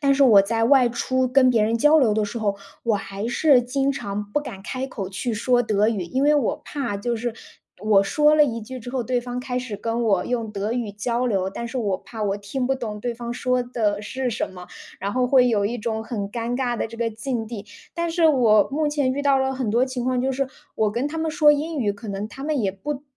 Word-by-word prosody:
但 280 -2 +3
是 280 - +3
我 220 -7 +8
在 225 +3 -1
外 255 0 +5
出 260 +2 0
跟 255 0 +4
别 230 -3 +3
人 225 +2 +1
交 295 +6 +5
流 235 -8 +3
的 215 0 +1
时 210 +3 -5
候， 205 -3 0 0.3
我 230 -2 +2
还 200 +1 -4
是 265 +2 +4
经 270 +3 0
常 210 -7 -4
不 - - +2
敢 245 -10 -8
开 260 +5 -4
口 205 -8 -5
去 210 +5 -3
说 245 +3 +2
德 215 -1 +2
语， 210 -5 -1
因 260 +11 -1
为 295 +1 +5
我 270 - -1
怕 270 -8 -3
就 235 +4 -2
是 235 0 -3 0.5
我 210 -2 +4
说 300 +9 +3
了 300 -1 +6
一 230 -5 -3
句 255 +4 -8
之 245 - -8
后， 255 -2 -2
对 245 +1 0
方 245 0 -5
开 250 0 -4
始 250 -4 -3
跟 230 +3 -2
我 200 -6 +2
用 230 -3 -2
德 210 +1 -3
语 235 -3 -2
交 235 +4 -1
流， 195 -5 0
但 235 +5 -6
是 255 - -4
我 205 -5 0
怕 220 +1 -8
我 200 0 0
听 225 +6 -3
不 270 - +1
懂 225 -5 -5
对 240 +2 -3
方 235 0 -5
说 250 +1 0
的 215 -4 -1
是 260 +4 -3
什 230 - -3
么， 180 -1 -11 0.3
然 200 +1 -3
后 250 +1 +1
会 255 -1 +5
有 210 -4 +1
一 235 +4 -2
种 220 0 -2
很 220 -3 -4
尴 235 +3 -3
尬 245 -2 -1
的 225 - -2
这 230 - -10
个 230 0 0
境 225 +1 -4
地。 215 -2 -7 0.3
但 340 -1 -1
是 330 0 +3
我 235 -8 +4
目 300 +1 +1
前 285 -3 0
遇 285 +2 -3
到 275 -1 +4
了 265 0 0
很 255 -5 -2
多 240 +3 +3
情 260 -2 -4
况， 255 -1 +1
就 265 +1 0
是 270 0 -1 0.3
我 215 -1 +1
跟 240 +6 -1
他 325 +2 -4
们 320 0 -1
说 305 -2 +5
英 305 +2 -2
语 210 -6 +1
可 210 +2 -10
能 200 +1 -3
他 270 +5 -10
们 295 -1 0
也 195 -3 0
不 275 +8 -5
240 Hz, 275 characters per minute, -23 LUFS, 215-265 Hz, 0.5 s, 我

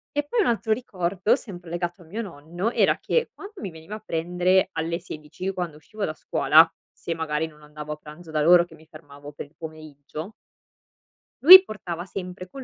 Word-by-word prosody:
E 290 0 0
poi 465 +8 +1
un - - +1
altro 220 -1 +1
ricordo, 200 -1 0
sempre 180 -9 -10
legato 175 +1 -4
a - - -15
mio 205 +8 -5
nonno, 175 +1 -4
era - - +3
che 480 0 0
quando 405 +1 -11
mi 195 - -5
veniva 160 +5 -9
a 215 - -11
prendere 180 +3 +1
alle 165 +1 -2
16, 165 +2 -7
quando 175 -5 -4
uscivo 205 +7 -8
da 155 - -1
scuola, - - +4 0.2
se 170 - -5
magari 160 -1 -2
non 150 -1 -18
andavo 150 0 -7
a - - -6
pranzo 155 +3 -13
da 155 -1 0
loro 170 +2 +6
che 165 - -16
mi 160 0 -19
fermavo 145 -2 -13
per 145 - -8
il 145 +3 -25
pomeriggio 155 +3 -9 1.1
lui 375 +5 +12
portava 180 - -6
sempre 185 -1 -7
con 270 +4 -9
175 Hz, 195 wpm, -24 LUFS, 155-200 Hz, 1.1 s, lui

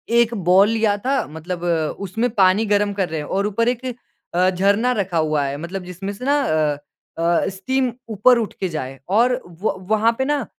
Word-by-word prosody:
एक 235 0 +4 0.2
बोल 195 +3 +6
लिया 220 -2 +1
था 275 0 +1
मतलब 170 +3 -6
अ, 165 -3 +1
उसमें 225 +6 -1
पानी 195 +2 +4
गरम 205 -1 +1
कर 195 -3 -1
रहे 160 0 -3
हैं 150 - -6
और 200 +2 0
ऊपर 230 +3 0
एक 250 +1 -3 0.5
अ, 180 +2 +3
झरना 200 +6 +2
रखा 195 -7 -1
हुआ 155 -2 +1
है, 140 +1 -3
मतलब 175 +5 -6
जिसमें 185 +3 -6
से 230 +5 -8
ना 285 +2 +3
अ, 155 - +1 0.4
अ, 170 +1 +2
स्टीम 250 +7 -1 0.2
ऊपर 225 +4 +4
उठ 225 -3 -2
के 190 - -1
जाए 135 -4 -5
और 245 +5 +3 0.2
व 220 - 0
वहाँ 220 +1 +3
पे 265 - 0
ना 290 -3 0
200 Hz, 205 wpm, -21 LUFS, 175-230 Hz, 0.5 s, बोल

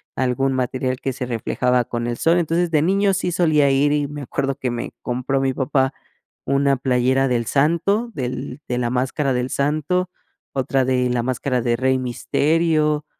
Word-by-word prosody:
algún 130 +1 0
material 130 0 -1
que 135 - -2
se 125 0 -4
reflejaba 125 +1 0
con 120 -1 -3
el 120 0 -2
sol. 165 +1 +3
Entonces, 170 +1 +1
de 155 -2 +2
niño 195 +4 +2
sí 180 -1 -1
solía 155 -5 +3
ir, 145 +2 +3
y 145 -1 0
me 145 0 -7
acuerdo 135 +1 -2
que 130 - -3
me 120 0 -4
compró 130 +2 -1
mi 135 -1 0
papá 135 0 0 0.5
una 140 0 +2
playera 130 +1 +2
del 120 -2 0
Santo, 170 - +1
del 130 0 -5
de 125 - -1
la 120 -1 0
máscara 135 +3 0
del 125 +1 -1
Santo, 155 +6 0 0.4
otra 135 0 +1
de 125 -1 +1
la 120 -1 0
máscara 125 0 -1
de 120 0 +1
Rey 130 +1 +2
Misterio, 150 +4 +1
135 Hz, 175 wpm, -21 LUFS, 125-150 Hz, 0.5 s, sol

